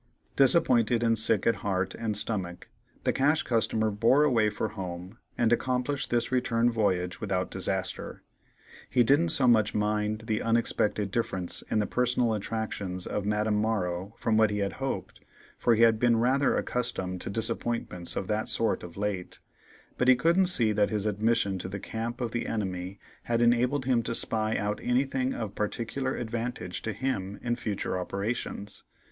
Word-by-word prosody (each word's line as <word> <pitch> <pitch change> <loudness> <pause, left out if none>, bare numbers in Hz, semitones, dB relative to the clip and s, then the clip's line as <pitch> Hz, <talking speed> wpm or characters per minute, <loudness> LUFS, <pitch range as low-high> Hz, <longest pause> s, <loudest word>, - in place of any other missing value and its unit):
Disappointed, 120 -5 +4
and 115 -1 +3
sick 110 0 +2
at 115 - +3
heart 95 -1 -1
and 110 -2 -2
stomach, 95 -5 -3 0.3
the - - +1
Cash 150 +5 +2
Customer 110 -2 +1
bore 120 +8 +4
away 115 -7 +3
for 105 +1 -3
home, 90 +2 -7 0.2
and 120 -1 +3
accomplished 130 +3 -1
the 120 -1 +1
return 120 -2 +2
voyage 90 -5 0
without 95 -4 -1
disaster. - - -3 0.7
He 125 - +4
didn't 145 +7 +3
so 135 - +2
much 110 -3 +4
mind 105 0 0
the 110 -1 -2
unexpected 110 -3 +1
difference 95 -5 -1
in - - +1
the 105 - +2
personal 125 -1 +1
attractions 100 -4 -4
of 105 -1 -3
Madame 105 0 +1
Morrow 100 -2 -1
from 110 -1 +1
what 110 -1 +5
he 105 - -2
had 100 -1 -1
hoped, 135 - -4 0.4
for 120 - +3
he 115 - +4
had 115 -1 +5
been 120 -1 +3
rather 130 +4 +2
accustomed 95 -7 -2
to - - -4
disappointments 110 -3 -2
of 95 - -2
that 105 +2 -1
sort 115 - 0
of 85 0 -10
late, 100 -3 -3 0.6
but 125 - +2
he 130 - +8
couldn't 170 +8 +3
see 115 -11 +3
that 105 -1 +2
his 105 -2 -2
admission 105 -2 +1
to 90 - -5
the 100 +1 -5
camp 115 +4 -5
of 120 -2 -2
the 120 - -2
enemy 95 -3 -3 0.3
had 115 -1 0
enabled 125 +3 +2
him 125 -3 +2
to 115 - -1
spy 110 -1 +1
out 105 +1 -2
anything 130 +1 0
of 110 -3 -4
particular 120 +6 -2
advantage 115 -5 -4
to 110 - -3
him 105 -4 -3
in 120 -1 0
future 105 -5 -3
operations. 100 +1 -4
110 Hz, 170 wpm, -28 LUFS, 100-120 Hz, 0.7 s, he